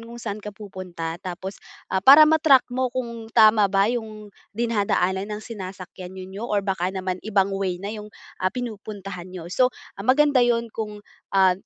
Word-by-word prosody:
kung 230 Hz, +1 st, -10 dB
saan 215 Hz, -3 st, -5 dB
ka 210 Hz, -, -7 dB
pupunta 180 Hz, -5 st, -6 dB
tapos, 190 Hz, +2 st, -7 dB, 0.3 s
ah, 190 Hz, -, +2 dB
para 280 Hz, +9 st, +9 dB
ma-track 305 Hz, -4 st, +5 dB
mo 255 Hz, 0 st, 0 dB
kung 235 Hz, -3 st, -5 dB
tama 215 Hz, -2 st, +6 dB
ba 195 Hz, 0 st, +3 dB
'yong 215 Hz, -3 st, -6 dB, 0.2 s
dinadaanan 200 Hz, -4 st, 0 dB
ng 215 Hz, -, -9 dB
sinasakyan 190 Hz, -3 st, -8 dB
ninyo 190 Hz, +2 st, -8 dB
or 205 Hz, -2 st, 0 dB
baka 190 Hz, -2 st, 0 dB
naman 185 Hz, -1 st, -3 dB
ibang 200 Hz, -2 st, +1 dB
way 195 Hz, -2 st, -1 dB
na 200 Hz, +4 st, -6 dB
yung, 210 Hz, -1 st, -8 dB, 0.3 s
ah, 185 Hz, -, +2 dB
pinupuntahan 200 Hz, -5 st, -7 dB
niyo. 180 Hz, -1 st, -8 dB
So, 250 Hz, +5 st, +4 dB, 0.3 s
ah, -, -, -4 dB
maganda 270 Hz, +3 st, +4 dB
'yun 235 Hz, -2 st, +1 dB
kung 210 Hz, -2 st, -6 dB, 0.2 s
ah, 190 Hz, -1 st, +4 dB
205 Hz, 170 wpm, -24 LUFS, 190-230 Hz, 0.3 s, para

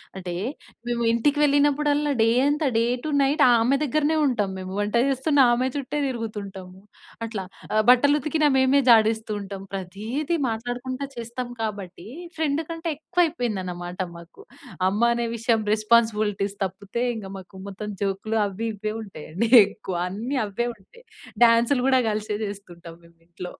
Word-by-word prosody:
అంటే, 180 Hz, -2 st, -5 dB, 0.5 s
మేము 240 Hz, -1 st, -1 dB
ఇంటికి 255 Hz, +6 st, +1 dB
వెళ్ళినప్పుడల్లా 290 Hz, +1 st, +2 dB
డే 225 Hz, -, +4 dB, 0.2 s
అంత 295 Hz, +2 st, 0 dB
డే 230 Hz, -, +3 dB, 0.2 s
టూ 310 Hz, -, -3 dB
నైట్ 280 Hz, +3 st, +2 dB
ఆమె 235 Hz, +4 st, +3 dB
దగ్గరనే 305 Hz, +3 st, +1 dB
ఉంటాం 230 Hz, -7 st, 0 dB
మేము. 185 Hz, 0 st, -7 dB
వంట 205 Hz, +2 st, -1 dB
చేస్తున్న 275 Hz, +1 st, +3 dB
ఆమె 250 Hz, +2 st, +1 dB
చుట్టే 285 Hz, +1 st, -3 dB
తిరుగుతుంటాం. 210 Hz, -6 st, -6 dB, 0.6 s
అట్లా 215 Hz, -4 st, -5 dB, 0.3 s
ఆహ్, 215 Hz, 0 st, +3 dB
బట్టలు 285 Hz, +4 st, +6 dB
ఉతికిన 305 Hz, +2 st, 0 dB
మేమే 265 Hz, +2 st, +4 dB
జాడిస్తూ 220 Hz, -1 st, +4 dB
ఉంటాం. 195 Hz, -1 st, -7 dB
ప్రతిది 215 Hz, -, -3 dB
మాట్లాడుకుంట 245 Hz, +3 st, -4 dB, 0.2 s
చేస్తాం 235 Hz, +1 st, -5 dB
కాబట్టి, 200 Hz, -4 st, -6 dB, 0.3 s
ఫ్రెండ్ 310 Hz, 0 st, 0 dB
కంటే 330 Hz, 0 st, -4 dB
ఎక్కువ 315 Hz, +4 st, +1 dB
అయిపోయింది 240 Hz, -, -2 dB
అన్నమాట 175 Hz, 0 st, -6 dB, 0.2 s
మాకు. 170 Hz, 0 st, -14 dB, 0.5 s
అమ్మ 205 Hz, +4 st, -2 dB
అనే 235 Hz, 0 st, -1 dB
విషయం 225 Hz, -1 st, +1 dB
రెస్పాన్సిబిలిటీస్ 215 Hz, -2 st, +1 dB
తప్పితే, 195 Hz, +5 st, -4 dB
ఇంక 215 Hz, -3 st, -7 dB
మాకు 190 Hz, +1 st, -13 dB
మొత్తం 210 Hz, +2 st, -6 dB
జోక్‌లు 200 Hz, +3 st, -2 dB
అవి, 215 Hz, +4 st, -4 dB
ఇ‌వే, 215 Hz, +1 st, -4 dB
ఉంటాయి 195 Hz, -8 st, -10 dB
అండి 205 Hz, +8 st, 0 dB, 0.2 s
ఎక్కువ 195 Hz, -2 st, -7 dB
అన్ని 225 Hz, +9 st, -4 dB
అవే 210 Hz, +4 st, -2 dB
ఉంటాయి. 210 Hz, -, -21 dB, 0.4 s
డాన్స‌లు 235 Hz, +3 st, +4 dB
కూడా 260 Hz, -1 st, +4 dB
కలిసే 210 Hz, 0 st, -2 dB
చేసుకుంటాం 175 Hz, -5 st, -9 dB
మేము 170 Hz, 0 st, -21 dB
ఇంట్లో. 180 Hz, +1 st, -8 dB
225 Hz, 145 wpm, -24 LUFS, 200-270 Hz, 0.6 s, బట్టలు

